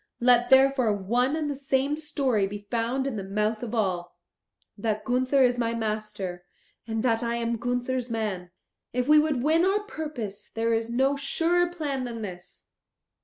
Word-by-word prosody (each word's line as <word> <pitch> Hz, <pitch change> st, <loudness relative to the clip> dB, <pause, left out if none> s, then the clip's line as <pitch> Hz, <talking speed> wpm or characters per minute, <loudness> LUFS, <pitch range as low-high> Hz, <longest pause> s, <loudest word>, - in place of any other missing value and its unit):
Let 245 Hz, 0 st, +4 dB
therefore 265 Hz, -4 st, +5 dB
one 245 Hz, +8 st, +1 dB
and 310 Hz, -2 st, -1 dB
the 290 Hz, -, -1 dB
same 275 Hz, +1 st, 0 dB
story 275 Hz, -9 st, 0 dB
be 205 Hz, +1 st, -8 dB
found 240 Hz, +3 st, 0 dB
in 270 Hz, -5 st, -2 dB
the 195 Hz, -, -4 dB
mouth 210 Hz, +3 st, -1 dB
of 240 Hz, -1 st, -4 dB
all 180 Hz, -5 st, -1 dB, 0.6 s
that 215 Hz, 0 st, -2 dB
Gunther 255 Hz, +2 st, +3 dB
is 245 Hz, -1 st, +2 dB
my 230 Hz, -1 st, 0 dB
master, 215 Hz, -5 st, -4 dB, 0.4 s
and 225 Hz, 0 st, -2 dB
that 230 Hz, -3 st, +2 dB
I 235 Hz, 0 st, -1 dB
am 235 Hz, 0 st, -1 dB
Gunther's 245 Hz, +1 st, -2 dB
man. 210 Hz, -6 st, -3 dB, 0.4 s
If 250 Hz, +1 st, 0 dB
we 305 Hz, 0 st, +7 dB
would 300 Hz, -5 st, +1 dB
win 320 Hz, +3 st, +3 dB
our 390 Hz, +3 st, +2 dB
purpose 295 Hz, -, -6 dB
there 230 Hz, 0 st, 0 dB
is 225 Hz, 0 st, -1 dB
no 265 Hz, +4 st, +2 dB
surer 335 Hz, +5 st, +1 dB
plan 290 Hz, -7 st, -3 dB
than 230 Hz, -2 st, -5 dB
this." 180 Hz, -3 st, -9 dB
245 Hz, 170 wpm, -26 LUFS, 215-275 Hz, 0.6 s, we